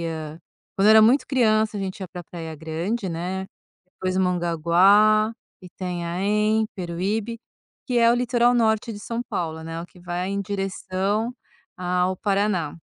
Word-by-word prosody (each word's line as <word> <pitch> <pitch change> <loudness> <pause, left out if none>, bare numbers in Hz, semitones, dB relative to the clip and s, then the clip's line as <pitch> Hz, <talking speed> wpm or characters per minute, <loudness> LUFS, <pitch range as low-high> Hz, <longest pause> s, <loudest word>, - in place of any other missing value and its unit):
ia - - -3 0.7
quando 195 +2 +3
eu - - +8
era 220 0 +8
muito 245 +6 +4
criança, 220 -5 +2
a - - -3
gente 190 0 -4
ia 190 - -5
pra 175 +1 -8
Praia 165 -2 -8
Grande, 170 +8 -3
né, 180 +3 -3 0.4
depois 185 0 -3
Mongaguá, 185 +5 +4 0.3
Itanhaém, 185 +5 -1
Peruíbe, 200 +6 -3 0.5
que 250 -2 0
é 230 -1 +5
o - - +3
litoral 245 0 +2
norte 225 -1 +1
de 205 - -8
São 230 +2 -4
Paulo, 160 -2 -3
né, 165 +1 -5
o - - -7
que 180 - -20
vai 175 +1 -3
em 200 0 -1
direção 195 +3 -2 0.4
ao 180 +1 0
Paraná 195 -7 0
195 Hz, 155 wpm, -24 LUFS, 175-215 Hz, 0.7 s, eu